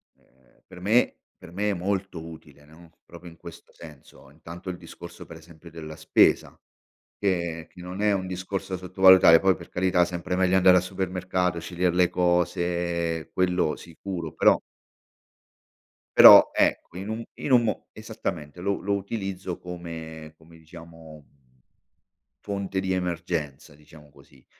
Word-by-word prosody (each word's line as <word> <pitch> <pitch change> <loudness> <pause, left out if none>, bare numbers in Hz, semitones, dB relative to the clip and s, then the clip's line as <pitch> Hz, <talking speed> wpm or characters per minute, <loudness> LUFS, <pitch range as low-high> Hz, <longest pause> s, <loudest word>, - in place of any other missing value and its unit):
ehm, 65 -1 -32
per 90 - -14
me 110 +6 +2 0.2
per 85 - -14
me 105 +3 -2
è - - -1
molto 95 -2 -4
utile 75 -3 -13
no, 80 +2 -18
proprio 85 +1 -12
in 85 - -18
questo - - -13
senso 75 -4 -15
intanto 85 +5 -11
il 90 - -5
discorso 85 0 -12
per 80 - -12
esempio 85 +1 -16
della 80 -1 -9
spesa 80 - +2 0.6
che 85 -4 -2
che 90 - -15
non 90 +3 -7
è 105 -1 +3
un 95 -1 -2
discorso 95 +1 -5
da - - -3
sottovalutare, 95 -2 +6
poi 95 -1 +3
per - - -13
carità 90 -1 +2
sempre 90 +1 -4
meglio 95 0 +2
andare 90 -1 +6
al - - -2
supermercato, 90 -2 -2
scegliere 90 +1 -2
le 90 -1 +3
cose, 85 -2 -1
quello 90 -3 0
sicuro, 85 -1 -7
però - - +3 1.6
però - - +10
ecco 90 - 0
in 100 +3 -6
un 115 +1 -4
in 140 - -5
un 120 -2 +5
mo 110 - -3
esattamente 75 +4 -7
lo 100 -1 -2
lo 100 +2 -1
utilizzo 95 -3 -5
come 80 -3 -9
come 80 +1 -19
diciamo 80 -2 -14 1.2
fonte 100 -2 -3
di 95 0 -3
emergenza, 85 -5 -4
diciamo 75 0 -18
così. 65 -2 -22
90 Hz, 150 wpm, -25 LUFS, 80-95 Hz, 1.6 s, però